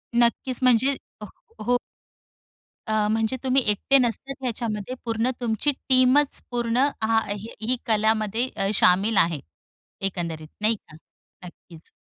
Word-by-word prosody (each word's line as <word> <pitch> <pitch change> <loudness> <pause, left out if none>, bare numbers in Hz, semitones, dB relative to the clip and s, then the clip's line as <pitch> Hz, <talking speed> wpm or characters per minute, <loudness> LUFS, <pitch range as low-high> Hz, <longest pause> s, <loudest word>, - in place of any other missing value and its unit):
नक्कीच 240 +1 +2
म्हणजे 255 +3 +4 0.3
अ - - -5 0.4
हो. 245 0 +2 1.1
अ, 215 -1 +1
म्हणजे 225 +3 0
तुम्ही 265 0 +3
एकटे 210 +6 +3
नसतात 255 +2 -1
ह्याच्यामध्ये 230 -1 -3
पूर्ण 230 +1 0
तुमची 235 +5 0 0.2
टीमच, 260 +2 +4
पूर्ण 240 +2 +1 0.2
हां, 225 0 +3 0.2
ही 215 +3 -9
ही 245 +4 0
कलामध्ये 220 +1 +1
अ, 195 0 0
शामिल 195 +2 +3
आहे, 165 -3 +3 0.7
एकंदरीत 170 -4 -5
नाही 220 +2 +3
का 155 - -17 0.5
नक्कीच 170 -2 -15
225 Hz, 125 wpm, -24 LUFS, 210-250 Hz, 1.1 s, म्हणजे